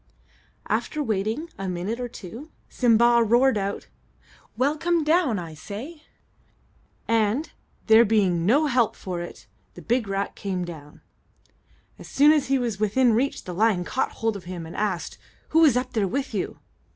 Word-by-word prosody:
After 305 Hz, -1 st, -1 dB
waiting 220 Hz, -, -2 dB
a 195 Hz, -1 st, -3 dB
minute 185 Hz, +7 st, -3 dB
or 245 Hz, -, -3 dB
two, 235 Hz, -, -10 dB, 0.2 s
Simba 235 Hz, 0 st, +4 dB
roared 240 Hz, +4 st, +3 dB
out, 200 Hz, -1 st, -3 dB, 0.7 s
"Well, 280 Hz, +4 st, +2 dB
come 340 Hz, +1 st, 0 dB
down, 305 Hz, -, +2 dB
I 170 Hz, -3 st, -6 dB
say!" 220 Hz, -, -8 dB, 1.1 s
and, 230 Hz, +7 st, +1 dB, 0.3 s
there 220 Hz, +1 st, +7 dB
being 195 Hz, -6 st, +2 dB
no 270 Hz, -, +3 dB
help 245 Hz, -6 st, +1 dB
for 180 Hz, -2 st, -5 dB
it, 175 Hz, -, -9 dB, 0.3 s
the -, -, -10 dB
big 240 Hz, -2 st, 0 dB
rat 195 Hz, 0 st, -3 dB
came 185 Hz, -3 st, -3 dB
down. 150 Hz, -4 st, -11 dB, 1.0 s
As -, -, -11 dB
soon 290 Hz, +2 st, +5 dB
as 300 Hz, -4 st, +2 dB
he 270 Hz, +1 st, +2 dB
was 235 Hz, -5 st, -2 dB
within 230 Hz, +3 st, +3 dB
reach, 260 Hz, +5 st, 0 dB
the 180 Hz, -, -6 dB
lion 195 Hz, -2 st, +1 dB
caught 260 Hz, -, -2 dB
hold 225 Hz, -2 st, -1 dB
of 195 Hz, -, -9 dB
him, 175 Hz, -2 st, -6 dB
and 160 Hz, -, -10 dB
asked, 195 Hz, -5 st, -3 dB, 0.3 s
"Who 320 Hz, -, +3 dB
was 295 Hz, -7 st, +5 dB
up 250 Hz, 0 st, -3 dB
there 215 Hz, -4 st, +1 dB
with 270 Hz, +7 st, -3 dB
you?" -, -, -3 dB
225 Hz, 165 wpm, -24 LUFS, 195-265 Hz, 1.1 s, there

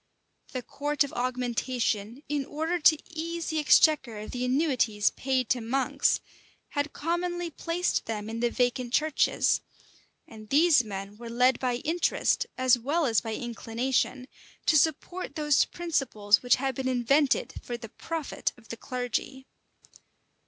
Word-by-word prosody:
The 255 Hz, -2 st, -3 dB
court 290 Hz, +4 st, 0 dB
of 285 Hz, -, -7 dB
augmentation, 245 Hz, -1 st, -2 dB
in 290 Hz, -1 st, -1 dB
order 320 Hz, +5 st, -2 dB
to 310 Hz, 0 st, +6 dB
ease 335 Hz, +1 st, -4 dB
the 315 Hz, -, 0 dB
exchequer 290 Hz, -5 st, +4 dB
of 210 Hz, +1 st, -7 dB
the 250 Hz, 0 st, -3 dB
annuities 250 Hz, -6 st, +2 dB
paid 260 Hz, -2 st, -1 dB
to 250 Hz, -, +1 dB
monks, 260 Hz, +4 st, +1 dB, 0.5 s
had 285 Hz, +1 st, -2 dB
commonly 345 Hz, +2 st, -2 dB
placed 340 Hz, +3 st, -1 dB
them 215 Hz, -2 st, -4 dB
in 225 Hz, +1 st, -5 dB
the 240 Hz, 0 st, +2 dB
vacant 245 Hz, 0 st, -1 dB
churches; 310 Hz, -1 st, +2 dB, 0.7 s
and 215 Hz, -1 st, -12 dB
these 305 Hz, -2 st, +5 dB
men 200 Hz, -1 st, -7 dB
were 235 Hz, 0 st, -8 dB
led 250 Hz, +2 st, +3 dB
by 250 Hz, -2 st, 0 dB
interest, 325 Hz, +7 st, 0 dB
as 255 Hz, -1 st, +4 dB
well 295 Hz, +7 st, 0 dB
as 230 Hz, -5 st, +2 dB
by 225 Hz, -2 st, -4 dB
inclination, 245 Hz, +2 st, -2 dB, 0.4 s
to 315 Hz, -, +4 dB
support 325 Hz, +5 st, 0 dB
those 295 Hz, -3 st, +3 dB
principles 255 Hz, -12 st, +1 dB
which 245 Hz, -, +4 dB
had 270 Hz, 0 st, -2 dB
been 260 Hz, +1 st, -3 dB
invented 260 Hz, +3 st, +2 dB
for 240 Hz, -, -5 dB
the 230 Hz, -2 st, -10 dB
profit 325 Hz, +5 st, -4 dB
of 235 Hz, -2 st, -20 dB
the 230 Hz, -, -6 dB
clergy. 255 Hz, +1 st, -4 dB
260 Hz, 145 wpm, -28 LUFS, 235-305 Hz, 0.7 s, to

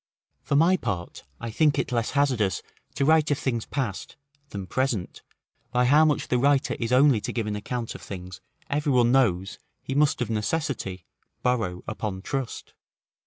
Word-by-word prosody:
For -, -, -1 dB
my 170 Hz, +6 st, +5 dB
part, 95 Hz, -, -4 dB
I 115 Hz, -, -5 dB
think 150 Hz, +4 st, +3 dB
it -, -, -1 dB
less 115 Hz, -2 st, 0 dB
hazardous 125 Hz, -9 st, +1 dB, 0.3 s
to 140 Hz, -, +1 dB
write 155 Hz, 0 st, +4 dB
of 145 Hz, -, +2 dB
things 120 Hz, -5 st, -2 dB
past, 125 Hz, -9 st, -3 dB, 0.3 s
than 100 Hz, -2 st, -5 dB
present, 120 Hz, -4 st, -2 dB, 0.5 s
by 125 Hz, 0 st, +2 dB
how 150 Hz, +5 st, +6 dB
much 150 Hz, -2 st, +1 dB
the 125 Hz, -, +2 dB
writer 140 Hz, +1 st, +3 dB
is 115 Hz, 0 st, -2 dB
only 130 Hz, -3 st, +5 dB
to -, -, -3 dB
give 115 Hz, -3 st, -2 dB
an 105 Hz, -1 st, -2 dB
account 115 Hz, +2 st, -4 dB
of -, -, -10 dB
things 90 Hz, -1 st, -8 dB, 0.3 s
every 145 Hz, 0 st, 0 dB
one 120 Hz, -1 st, +4 dB
knows 95 Hz, -8 st, +2 dB, 0.2 s
he 135 Hz, -, -4 dB
must 145 Hz, +1 st, +3 dB
of 120 Hz, -3 st, -2 dB
necessity 110 Hz, -, -2 dB, 0.4 s
borrow 110 Hz, -8 st, 0 dB
upon 105 Hz, -3 st, -4 dB
trust. 135 Hz, -2 st, -4 dB
125 Hz, 170 wpm, -26 LUFS, 105-140 Hz, 0.5 s, how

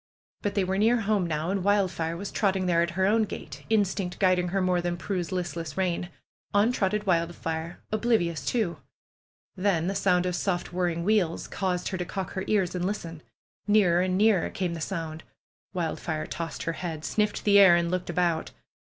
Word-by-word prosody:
But 205 Hz, -1 st, -2 dB
they 200 Hz, -, +2 dB
were 190 Hz, +1 st, -1 dB
near 230 Hz, +2 st, +3 dB
home 200 Hz, -4 st, +1 dB
now, 160 Hz, +2 st, -1 dB
and 195 Hz, -2 st, -1 dB
Wildfire 185 Hz, -5 st, +1 dB
was 200 Hz, +3 st, -5 dB
trotting 190 Hz, -3 st, +1 dB
there 170 Hz, -2 st, +3 dB
at 170 Hz, -, +1 dB
her 190 Hz, -, +3 dB
own 220 Hz, +3 st, +3 dB
gait, 210 Hz, -, -7 dB
instinct 195 Hz, -4 st, 0 dB
guiding 185 Hz, -2 st, +3 dB
her 195 Hz, +3 st, 0 dB
more 180 Hz, -1 st, +2 dB
than 175 Hz, 0 st, -2 dB
Prue's 180 Hz, 0 st, -3 dB
listless 170 Hz, -4 st, -4 dB
rein. 180 Hz, -2 st, -1 dB, 0.5 s
On 210 Hz, +4 st, +4 dB
trotted 210 Hz, -2 st, 0 dB
Wildfire, 170 Hz, -1 st, -1 dB
oblivious 210 Hz, -, +1 dB
too. 175 Hz, -, 0 dB, 0.8 s
Then 185 Hz, -4 st, +1 dB
the 190 Hz, -, 0 dB
sound 185 Hz, -2 st, +2 dB
of 180 Hz, -1 st, -1 dB
soft 175 Hz, -2 st, -2 dB
whirring 175 Hz, -2 st, 0 dB
wheels 190 Hz, -4 st, +1 dB
caused 185 Hz, -2 st, -2 dB
her 185 Hz, -, -4 dB
to 180 Hz, -, -2 dB
cock 190 Hz, 0 st, -4 dB
her 190 Hz, -, -3 dB
ears 190 Hz, -4 st, +1 dB
and 180 Hz, -1 st, -2 dB
listen. 170 Hz, -5 st, -4 dB, 0.5 s
Nearer 195 Hz, -5 st, +4 dB
and 185 Hz, 0 st, +1 dB
nearer 210 Hz, -3 st, +3 dB
came 185 Hz, -5 st, -2 dB
the 165 Hz, -, -6 dB
sound! 160 Hz, -3 st, -4 dB, 0.5 s
Wildfire 160 Hz, -2 st, -2 dB
tossed 165 Hz, -1 st, -5 dB
her 165 Hz, -, -1 dB
head, 160 Hz, -2 st, -5 dB
sniffed 210 Hz, -1 st, 0 dB
the 200 Hz, -1 st, +6 dB
air 190 Hz, -3 st, +8 dB
and 170 Hz, 0 st, +1 dB
looked 180 Hz, -1 st, -2 dB
about. 175 Hz, -1 st, 0 dB
180 Hz, 185 wpm, -27 LUFS, 170-200 Hz, 0.8 s, air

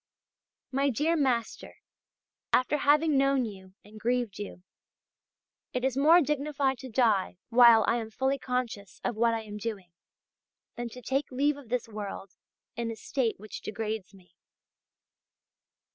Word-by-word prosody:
'My 275 Hz, +1 st, +2 dB
dear 300 Hz, +7 st, +1 dB
master, 255 Hz, -7 st, -1 dB, 0.8 s
after 255 Hz, +4 st, +3 dB
having 295 Hz, 0 st, +3 dB
known 275 Hz, -2 st, +3 dB
you 190 Hz, -3 st, -10 dB
and 215 Hz, +1 st, -13 dB
grieved 240 Hz, -3 st, -1 dB
you, 200 Hz, -3 st, -7 dB, 1.1 s
it 250 Hz, 0 st, -1 dB
is 265 Hz, -2 st, 0 dB
more 315 Hz, +6 st, +6 dB
dignified 285 Hz, -2 st, 0 dB
to 260 Hz, -, -8 dB
die 220 Hz, -7 st, +2 dB
while 235 Hz, -2 st, +7 dB
I 235 Hz, -, +3 dB
am 225 Hz, -2 st, -4 dB
fully 265 Hz, +4 st, -1 dB
conscious 250 Hz, -6 st, -4 dB
of 240 Hz, -, -1 dB
what 230 Hz, +1 st, +2 dB
I 225 Hz, -, -4 dB
am 210 Hz, -1 st, -8 dB
doing, 205 Hz, -5 st, -5 dB, 0.8 s
than 240 Hz, 0 st, -4 dB
to 250 Hz, +2 st, -11 dB
take 270 Hz, +3 st, -1 dB
leave 285 Hz, +3 st, +1 dB
of 280 Hz, -5 st, -13 dB
this 245 Hz, -1 st, -1 dB
world 205 Hz, -3 st, -7 dB, 0.4 s
in 235 Hz, 0 st, -3 dB
a 225 Hz, -, -4 dB
state 235 Hz, -2 st, -2 dB
which 215 Hz, +1 st, -8 dB
degrades 215 Hz, -2 st, -4 dB
me. 185 Hz, -3 st, -20 dB
240 Hz, 145 wpm, -29 LUFS, 215-270 Hz, 1.1 s, while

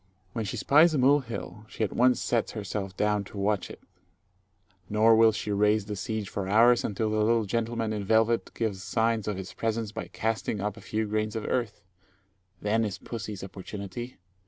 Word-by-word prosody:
When 115 Hz, -, -2 dB
she 95 Hz, -, -4 dB
spies 155 Hz, +3 st, +5 dB
a -, -, +2 dB
mole 140 Hz, +3 st, +5 dB
hill, 115 Hz, -4 st, -7 dB
she -, -, -3 dB
at 105 Hz, -, -1 dB
once 125 Hz, +1 st, +4 dB
sets 115 Hz, -3 st, 0 dB
herself 100 Hz, -3 st, -4 dB
down 105 Hz, -1 st, +1 dB
to 105 Hz, -, -11 dB
watch 100 Hz, 0 st, 0 dB
it; -, -, -10 dB, 1.1 s
nor 110 Hz, +2 st, +5 dB
will 115 Hz, 0 st, +6 dB
she 105 Hz, 0 st, -4 dB
raise 105 Hz, +1 st, +2 dB
the 105 Hz, 0 st, -4 dB
siege 110 Hz, 0 st, -3 dB
for 95 Hz, 0 st, -4 dB
hours, 115 Hz, +4 st, +5 dB
until 110 Hz, +1 st, -1 dB
the 110 Hz, -, +1 dB
little 115 Hz, 0 st, +2 dB
gentleman 115 Hz, +1 st, -1 dB
in 105 Hz, -1 st, -3 dB
velvet 110 Hz, +3 st, +2 dB
gives 105 Hz, -5 st, -2 dB
signs 110 Hz, +2 st, 0 dB
of 105 Hz, -2 st, -2 dB
his 95 Hz, -1 st, -7 dB
presence 115 Hz, -1 st, -2 dB
by -, -, -6 dB
casting 110 Hz, -1 st, -2 dB
up 105 Hz, +1 st, -2 dB
a 110 Hz, -, -12 dB
few 110 Hz, +1 st, -2 dB
grains 110 Hz, +1 st, -1 dB
of 110 Hz, -, -3 dB
earth. 120 Hz, -7 st, -2 dB, 0.8 s
Then 110 Hz, +2 st, +2 dB
is 100 Hz, -6 st, -3 dB
pussy's 105 Hz, 0 st, -6 dB
opportunity. 100 Hz, +5 st, -7 dB
110 Hz, 190 wpm, -28 LUFS, 105-115 Hz, 1.1 s, will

